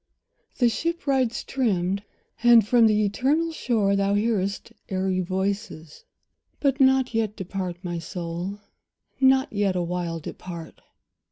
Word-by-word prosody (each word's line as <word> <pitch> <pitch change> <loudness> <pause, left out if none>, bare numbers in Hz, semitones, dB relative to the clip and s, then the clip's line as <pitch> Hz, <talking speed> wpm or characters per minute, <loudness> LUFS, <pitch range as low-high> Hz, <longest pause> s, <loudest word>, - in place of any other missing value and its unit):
The 245 - +4
ship 335 +10 -2
rides 260 -4 +1
trimmed, 200 -7 0 0.4
and 235 -2 +7
from 235 -1 +5
the 215 -1 +3
eternal 285 +11 +1
shore 220 -10 +1
Thou 200 0 +1
hearest 205 -2 -1 0.2
airy 190 -1 0
voices; 190 -3 -3 0.5
but 275 -1 +1
not 265 -2 +4
yet 220 -2 0
Depart, 185 -2 -4
my 175 -2 -3
soul, 170 +3 -5 0.6
not 265 -1 +4
yet 200 -2 +1
awhile 175 -1 -2
depart. 170 +1 -9
200 Hz, 120 wpm, -25 LUFS, 185-245 Hz, 0.6 s, and